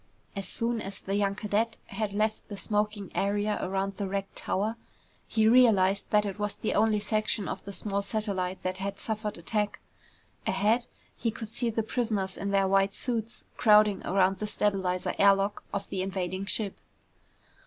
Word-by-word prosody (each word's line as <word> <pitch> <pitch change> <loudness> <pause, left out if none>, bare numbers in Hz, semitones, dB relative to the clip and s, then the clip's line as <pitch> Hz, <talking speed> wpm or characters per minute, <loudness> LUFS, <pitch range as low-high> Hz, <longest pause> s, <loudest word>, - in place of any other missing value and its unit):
As 195 -1 -3
soon 230 -1 -1
as 195 0 -6
the 195 - -4
young 200 -1 +1
cadet 215 +2 0
had 205 +1 -3
left 215 +2 -1
the 205 - -7
smoking 210 -1 -1
area 205 +1 0
around 195 +1 -2
the 200 - -2
wrecked 195 0 -3
tower, 210 +4 -1 0.5
he 220 -1 +3
realized 210 -5 +5
that 210 0 +3
it 200 0 -4
was 210 0 -1
the - - -2
only 215 0 +3
section 215 -1 -1
of - - -4
the 200 - -6
small 200 +1 -2
satellite 200 -3 -2
that 185 0 -2
had 200 +1 -3
suffered 215 -1 -3
attack. 210 +5 -1 0.7
Ahead, 215 +6 +2 0.3
he 230 - -1
could 225 0 -6
see 235 +1 -1
the 225 0 -1
prisoners 215 -5 -1
in 200 - -3
their 195 -1 +3
white 195 +1 +3
suits 230 -2 -3
crowding 210 -3 +5
around 190 0 +2
the 210 - -2
stabilizer 190 -4 0
air 200 0 +7
lock 195 +1 -2
of 200 0 -3
the 190 - -2
invading 185 0 -3
ship. 205 -2 0
205 Hz, 175 wpm, -29 LUFS, 195-215 Hz, 0.7 s, air